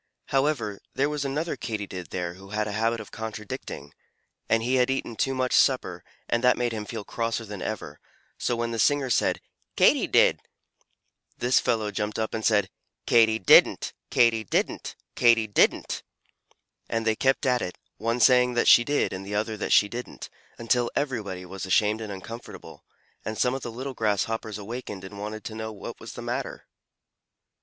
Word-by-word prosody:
However, 135 -7 0 0.2
there 140 +2 +2
was 150 -1 -2
another 150 +5 -2
Katydid 100 -6 -5
there 90 -1 -3
who 95 +2 -14
had 105 +1 -1
a - - -3
habit 115 +2 0
of 110 - -10
contradicting, 110 -2 -7 0.6
and 115 0 +3
he 130 +2 +2
had 125 0 +3
eaten 135 -3 -2
too 135 +4 0
much 130 -1 0
supper, - - +2 0.2
and 120 +1 0
that 125 0 +5
made 120 -1 0
him 110 -2 -4
feel 110 -1 -6
crosser 115 +1 -3
than 105 -3 -7
ever; 75 -9 -5 0.4
so 120 - 0
when 115 0 -2
the 115 - -3
singer 135 +4 +2
said - - +1 0.3
"Katy - - +4
did!" - - +4 1.0
this 125 +1 +2
cross - - -6
fellow 110 -4 +1
jumped 105 +1 -3
up 110 0 -2
and 110 - -3
said, 105 -4 +2 0.3
"Katy 110 -2 +5
didn't! 95 - +5 0.2
Katy 115 -2 +3
didn't!! 100 - -2 0.2
Katy 115 -2 +5
didn't!!!" 105 - +1 0.9
and 115 -1 -1
they 110 -1 +2
kept 135 +4 +1
at 125 -1 +2
it, 90 - -5 0.2
one 115 +2 -1
saying 125 +1 +5
that 120 - +2
she 120 - +8
did 145 +3 0
and 95 +1 -5
the 100 +1 -5
other 110 +1 -1
that 105 - -4
she 105 - +6
didn't, 120 +3 -7 0.3
until 120 +1 +1
everybody 105 -10 -2
was 95 +1 -7
ashamed 105 +3 +2
and 110 -2 -5
uncomfortable, 115 +5 -9 0.4
and 110 0 -4
some 125 - +2
of 135 - -4
the 120 - -5
little 130 +4 -5
Grasshoppers 110 -1 -1
awakened 105 -2 -7
and 100 +1 -9
wanted 105 +1 -6
to 110 - -6
know 110 0 -5
what 105 - -8
was - - -9
the - - -8
matter. - - -4
110 Hz, 180 wpm, -26 LUFS, 105-125 Hz, 1.0 s, she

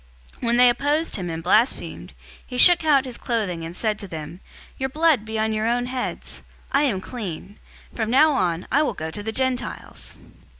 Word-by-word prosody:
018:006 - - -14
When 235 +1 +2
they 250 0 +7
opposed 295 +6 0
him 180 -3 -4
and 165 0 -5
blasphemed, 215 +8 0 0.3
he 250 - -7
shook 345 +5 +7
out 285 -4 +4
his 250 -2 -6
clothing 200 -8 -2
and 165 +1 -7
said 215 +1 -1
to 200 - -6
them, 160 0 -8 0.4
"Your 265 0 -1
blood 300 -5 +2
be 220 0 -4
on 220 0 0
your 215 +1 -1
own 245 +1 +1
heads! 255 0 -5 0.3
I 285 +2 +3
am 200 -9 -1
clean. 200 -4 -7 0.3
From 220 -2 -2
now 295 +6 +5
on, 180 - 0
I 285 - +4
will 305 - -1
go 160 0 -5
to 205 - -6
the 220 +2 -4
Gentiles!" 260 +1 -3
235 Hz, 200 wpm, -23 LUFS, 195-265 Hz, 0.4 s, they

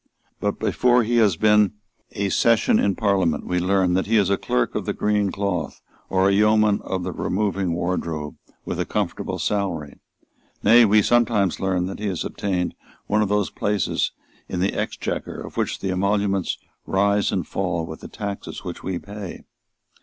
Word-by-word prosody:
But - - -1
before 125 -1 +3
he 120 +2 +1
has 105 -6 +4
been 105 +1 +4 0.4
a 100 -2 -1
session 115 +2 +3
in 100 -2 +2
Parliament 95 -7 +1
we 90 0 0
learn 95 0 +2
that 95 +2 +1
he 115 +1 +3
is 100 -2 +3
a - - +4
Clerk 60 -8 0
of - - -3
the - - 0
Green 105 -2 +1
Cloth 100 -4 -2 0.3
or 95 0 +3
a - - +4
Yeoman 105 0 +4
of 95 -1 -3
the 90 - -3
Removing 95 -2 -1
Wardrobe, 85 -3 -2 0.3
with - - -4
a - - 0
comfortable - - -2
salary. 90 -8 -2 0.6
Nay, 120 +1 +7
we 105 0 +5
sometimes 115 -6 +2
learn 95 -2 0
that 95 - -6
he 105 - -2
has 90 -4 -2
obtained 90 -3 -2 0.3
one 105 +1 +1
of 105 - +1
those 105 -1 +1
places 100 -4 0 0.4
in 90 - -3
the 95 +2 +1
Exchequer - - -3
of - - -9
which - - -1
the 95 - -1
emoluments 100 0 0 0.3
rise 100 +1 +2
and - - -1
fall 85 -1 -2
with 80 -1 -8
the - - -9
taxes 100 -2 -6
which - - -6
we 95 -1 -3
pay. 100 -1 -8
100 Hz, 175 wpm, -23 LUFS, 90-105 Hz, 0.6 s, Nay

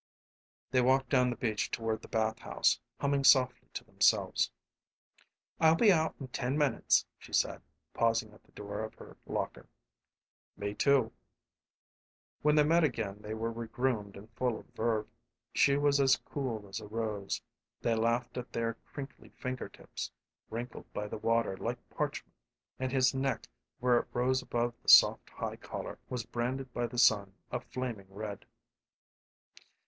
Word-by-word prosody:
They 130 -1 +4
walked 130 +1 +3
down 125 -2 +4
the 120 - -2
beach 110 -2 -1
toward 110 -1 -2
the - - -11
bathhouse, 110 +1 +1 0.2
humming 140 0 +1
softly 130 -2 +5
to - - -4
themselves. - - +2 1.1
"I'll 160 0 +6
be 210 +4 +6
out 160 -1 +1
in 135 -3 -7
ten 130 +2 -1
minutes," 145 -5 +3
she - - -14
said, - - +1 0.3
pausing 115 -2 +1
at - - -18
the - - -28
door 105 +1 -5
of 110 - -6
her - - -13
locker. - - -3 0.9
"Me 100 0 -3
too," 140 +6 +2
he 140 -3 +6
said. 85 - -24
When 150 0 +4
they 150 - +6
met 165 +3 +4
again 110 -8 -1
they 105 +1 -5
were 115 +1 -2
regroomed 115 -3 -2
and 100 +2 -11
full 120 0 -1
of - - -12
verve. 110 -2 0 0.5
She 140 0 +4
was 145 -1 +3
as 135 -2 +5
cool 115 -7 -4
as 95 +3 -5
a 105 - -9
rose. 105 -2 -3 0.4
They 115 - +2
laughed 115 +2 0
at 125 - -8
their 115 0 -1 0.2
crinkly 140 -1 -8
finger 130 -1 -5
tips - - -7 0.4
wrinkled 120 +2 -6
by 105 0 -3
the - - -5
water 115 -3 +1
like 120 +4 -2
parchment; - - -3 0.5
and 130 0 -1
his 130 0 +3
neck, 135 0 -1 0.3
where 125 -1 +4
it - - -6
rose 130 +2 +2
above 120 0 -1
the - - -2
soft - - +7
high - - -5
collar, - - -6
was 125 -3 -3
branded 125 +2 -3
by 120 0 -1
the 125 - -8
sun 100 -5 +4 0.2
a 125 - -1
flaming 120 -6 -5
red. 100 0 -6
120 Hz, 165 wpm, -32 LUFS, 110-130 Hz, 1.1 s, soft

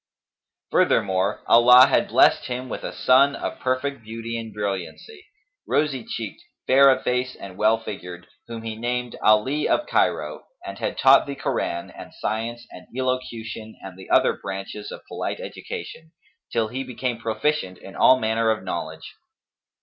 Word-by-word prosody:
Furthermore 95 0 +1
Allah 125 +2 +8
had - - +2
blessed - - +4
him 125 0 -5
with - - -5
a - - -4
son 135 +2 +4
of - - -5
perfect 130 +1 -2
beauty 115 +1 -6
and 115 -1 -5
brilliancy; 105 - -5 0.4
rosy 145 -4 0
cheeked, 110 -1 -6 0.2
fair 135 +1 +6
of 130 - +2
face 125 +1 -1
and 95 -2 -10
well 110 +3 +3
figured, 90 -5 -8 0.2
whom 115 -1 -7
he 110 -1 -5
named 120 +1 -3
Ali 120 +8 +3
of 300 - +2
Cairo, - - 0 0.2
and - - -7
had - - -3
taught - - +6
the 140 - -4
Koran 85 -9 -3
and - - -12
science 115 +2 -3
and 90 - -12
elocution 115 -4 -4
and 95 -2 -9
the 95 - -13
other - - +4
branches 100 +1 -7
of - - -10
polite - - -4
education, 160 +1 -8 0.4
till 115 -2 0
he 130 +4 -4
became 125 -2 -4
proficient 110 -3 -1
in 95 - -12
all 130 - +6
manner 110 0 +1
of 110 -2 0
knowledge. 80 -3 -6
115 Hz, 155 wpm, -23 LUFS, 105-130 Hz, 0.4 s, Allah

